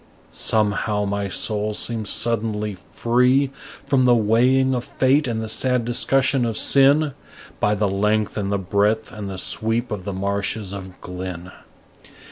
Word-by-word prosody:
Somehow 105 -1 0
my 100 0 -2
soul 105 +2 -2
seems 110 -2 -3
suddenly 110 -2 -1
free 125 +8 +1 0.3
From 130 -2 +2
the 120 -1 +5
weighing 125 +4 +3
of 125 -1 -1
fate 140 +1 +1
and 110 -2 -2
the - - -4
sad 125 +2 +1
discussion 130 +2 +2
of 115 -2 -1
sin, 140 +2 +4 0.5
By 105 - +2
the 105 0 +1
length 105 +2 0
and 100 -2 -2
the 100 - +1
breadth 100 +3 0
and 105 -2 -6
the 95 - -6
sweep 115 +6 -2
of 100 -3 -4
the 100 - -4
marshes 100 +1 -2
of 95 -2 -9
Glynn. 90 -1 -7
110 Hz, 150 wpm, -22 LUFS, 100-125 Hz, 0.5 s, the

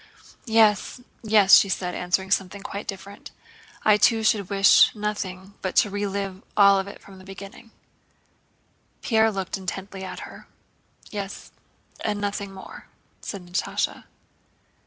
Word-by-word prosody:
"Yes, 220 0 +3 0.2
yes," 210 -3 +6
she 195 - +3
said, 180 -1 -2
answering 190 +2 -1
something 195 0 -1
quite 200 +1 -6
different. 200 +1 -8 0.6
"I 210 -1 +6
too 225 +1 +3
should 210 -4 +1
wish 195 -1 +6
nothing 200 -2 -5
but 185 - -3
to 205 - +3
relive 200 -1 -3
it 195 - -23
all 200 -1 +6
from 190 -1 -15
the - - -14
beginning." 195 +4 -11 1.3
Pierre 220 -1 +3
looked 195 -1 -4
intently 190 +1 -6
at 190 - -7
her. - - -11 0.6
"Yes, 200 -1 -7 0.5
and 210 -1 -1
nothing 200 -1 -3
more," 190 -1 -12 0.3
said 195 -4 -7
Natásha. 175 +1 -2
200 Hz, 130 wpm, -24 LUFS, 190-210 Hz, 1.3 s, yes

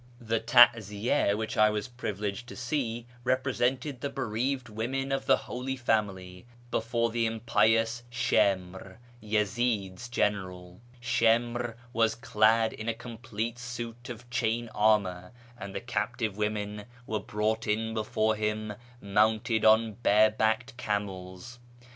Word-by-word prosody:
The 115 -2 -1
taziya 110 -3 +4
which 110 0 -4
I 110 0 +6
was 105 +2 -2
privileged 105 -2 -4
to - - -9
see 120 -2 -2 0.2
represented 130 +1 0
the 140 - -2
bereaved 130 0 -2
women 125 +5 -3
of 135 0 -2
the - - +6
Holy 130 +2 -4
Family 100 -6 -2 0.2
before 115 0 0
the 115 0 +1
impious 115 +1 +2
Shimr, 95 -4 0 0.2
Yezi'd's 105 0 -1
general. 90 -5 -2 0.2
Shimr 120 0 +1 0.2
was 115 -2 +2
clad 110 -2 +3
in 110 +1 -5
a 115 - -1
complete 115 0 -5
suit 120 0 -7
of 120 0 -8
chain 120 -1 0
armour, 100 -3 +1 0.2
and 100 -4 -8
the - - -1
captive 115 -2 -2
women 105 0 -3 0.2
were 110 -2 -2
brought 110 +2 -2
in 110 +1 0
before 110 0 0
him 105 0 -2 0.3
mounted 110 +2 +2
on 110 -1 +4
barebacked 110 +4 +3
camels. 100 +1 -4
110 Hz, 125 wpm, -29 LUFS, 105-120 Hz, 0.3 s, I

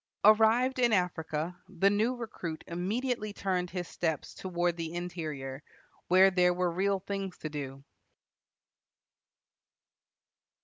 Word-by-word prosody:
Arrived 225 +5 +5
in 240 -2 +4
Africa, 170 -2 -1
the 195 +1 +3
new 220 +5 +1
recruit 185 -9 -6
immediately 215 +6 -2
turned 180 -3 -1
his 180 -1 -4
steps 160 -4 -2
toward 175 -2 -1
the 165 -1 -4
interior, 155 -6 -5 0.5
where 190 +2 +6
there 180 -1 +3
were 180 -1 +1
real 195 +3 +1
things 195 -1 -4
to 155 - -5
do. 135 -2 -6
180 Hz, 115 wpm, -30 LUFS, 165-205 Hz, 0.5 s, where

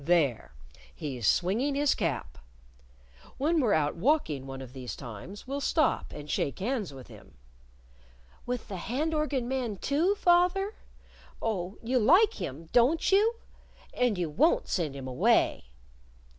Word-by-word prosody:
"There! 145 - +1 0.4
He's 125 -8 -3
swinging 225 - +2
his 285 0 +3
cap! 140 - -3 1.0
When 315 +3 +2
we're 230 -6 +3
out 150 -2 +1
walking 165 - 0
one 135 0 -7
of 130 -2 -9
these 130 -2 -6
times 125 - -9
we'll 275 +2 -4
stop 310 +2 +1
and 150 - -8
shake 140 - -1
hands 215 - -2
with 130 -2 -11
him!" - - -15 1.1
"With 245 -1 -3
the 195 - -5
hand 275 - -2
organ 295 -5 -1
man, 250 -5 -2
too, 320 - +1
fath 355 -1 +4
er? 390 +2 -2 0.7
Oh, 195 -4 -3
you 250 +2 +1
like 355 - +4
him, 160 -1 -5
don't 270 +10 +3
you? 430 +4 +4 0.6
And 245 -5 +1
you 175 -2 -1
won't 285 - +2
send 160 -7 -1
him 135 -1 -7
away!" 125 - +2
220 Hz, 145 wpm, -29 LUFS, -, 1.1 s, fath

